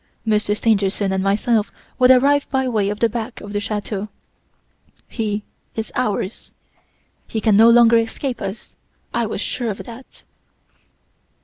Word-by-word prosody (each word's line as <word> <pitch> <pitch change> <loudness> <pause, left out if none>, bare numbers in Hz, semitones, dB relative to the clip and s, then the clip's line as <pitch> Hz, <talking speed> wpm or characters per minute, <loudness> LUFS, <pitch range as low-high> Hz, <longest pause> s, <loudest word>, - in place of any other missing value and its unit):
Monsieur 210 -1 +1
Stangerson 200 -3 +1
and 190 0 0
myself 210 +2 +1 0.3
would 250 0 +5
arrive 280 +3 +4
by 265 -1 0
way 215 -5 0
of 210 0 -4
the 230 - +4
back 230 +2 -5
of 205 0 -9
the 205 - 0
chateau. 205 0 -4 1.0
He 210 -3 -3 0.3
is 220 -1 -4
ours! 210 -4 -3 0.7
He 220 - -3
can 215 -1 +3
no 225 +3 +7
longer 235 -1 +6
escape 240 +3 -3
us! 195 +3 -7 0.4
I 235 -1 0
was 210 - -4
sure 240 -3 -2
of 200 - -5
that. 245 +2 -13
220 Hz, 145 wpm, -20 LUFS, 205-235 Hz, 1.0 s, no